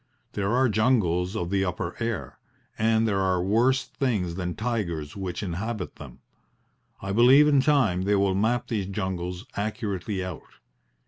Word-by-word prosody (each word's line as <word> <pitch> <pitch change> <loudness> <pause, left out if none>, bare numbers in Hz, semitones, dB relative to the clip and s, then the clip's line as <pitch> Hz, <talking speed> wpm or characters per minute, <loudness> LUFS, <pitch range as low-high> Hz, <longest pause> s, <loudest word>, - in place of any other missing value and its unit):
There 100 0 -1
are 130 +1 +4
jungles 105 -5 +1
of 85 -4 -3
the 100 -1 +2
upper 90 -1 -3
air, 115 -3 -4 0.4
and 110 +1 +2
there 100 -2 +1
are 95 -2 +1
worse 120 +7 +2
things 105 -11 -1
than 90 -1 -4
tigers 95 -11 -3
which 95 -1 -4
inhabit 100 +3 -4
them. - - -12 0.8
I 95 - -3
believe 125 +7 +6
in 145 -2 +4
time 130 -11 +2
they 100 +2 +2
will 100 -1 +2
map 110 +5 0
these 105 -5 -2
jungles 95 -2 -4
accurately 100 -2 -3
out. 90 -3 -9
100 Hz, 150 wpm, -26 LUFS, 90-115 Hz, 0.8 s, believe